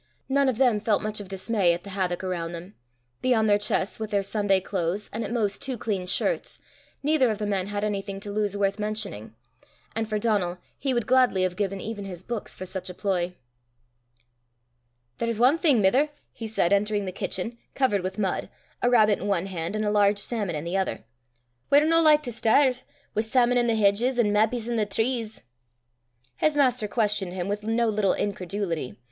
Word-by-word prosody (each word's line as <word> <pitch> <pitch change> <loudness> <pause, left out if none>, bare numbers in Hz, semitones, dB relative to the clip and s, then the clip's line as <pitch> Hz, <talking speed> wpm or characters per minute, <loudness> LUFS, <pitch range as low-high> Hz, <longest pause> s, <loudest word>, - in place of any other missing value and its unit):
None 275 0 +3
of 245 - -2
them 245 -5 +3
felt 210 -1 +1
much 215 0 -2
of 205 - -7
dismay 195 -1 +1
at 175 - -5
the 200 - -8
havoc 185 -2 -1
around 175 -2 -3
them: 175 +4 -8 0.5
beyond 230 -4 +3
their 205 -1 +4
chests 205 -1 0
with 220 -1 -4
their 200 -1 +1
Sunday 200 -1 +1
clothes 185 +1 -3
and 225 +2 -2
at - - -5
most 210 -4 0
two 260 -3 -1
clean 200 -5 -3
shirts, 195 - 0 0.5
neither 290 -4 +3
of 215 - -1
the 210 - -3
men 195 -2 -1
had 205 0 -3
anything 200 -1 -3
to 205 - -5
lose 205 -1 -1
worth 200 +1 0
mentioning; 210 - -4 0.6
and 225 -1 -2
for 215 - 0
Donal, 205 -5 0 0.2
he 275 - 0
would 240 -3 0
gladly 250 -7 +3
have 185 -1 0
given 195 0 -2
even 205 0 -5
his 180 -2 -7
books 235 -1 -5
for 185 - -7
such 185 0 -5
a 180 - -8
ploy. 180 -3 -1 1.8
"There's 230 -1 -1
ae 255 +5 +6
thing, 295 - +4
mither," 255 +10 +3 0.2
he 225 - -6
said, 200 -4 +2
entering 205 0 +1
the 185 - -3
kitchen, 210 +5 -4 0.2
covered 230 -8 +2
with 185 +1 -4
mud, 195 -3 -1 0.3
a 245 - +3
rabbit 215 -4 +4
in 200 - -4
one 190 -3 +1
hand 180 0 -4
and 215 0 -1
a 210 - +1
large 205 -1 +3
salmon 205 -5 -1
in 150 - -4
the 170 +3 -2
other, 190 - -2 0.7
"we're 290 +2 +6
no 330 +1 +4
like 305 -1 +5
to 245 - -3
sterve, 250 +3 +3 0.3
wi' 215 - +2
sawmon 245 +2 +3
i' - - 0
the 230 - +2
hedges, 220 +5 +2
an' 220 -4 +3
mappies 220 +2 +1
i' 240 - -1
the 220 - +2
trees!" 225 +1 -1 0.9
His 305 -1 +1
master 250 -6 +3
questioned 205 -4 0
him 180 -1 -3
with 205 +1 -2
no 225 +2 +1
little 210 -3 +2
incredulity. 185 - -3
210 Hz, 200 wpm, -26 LUFS, 195-235 Hz, 1.8 s, ae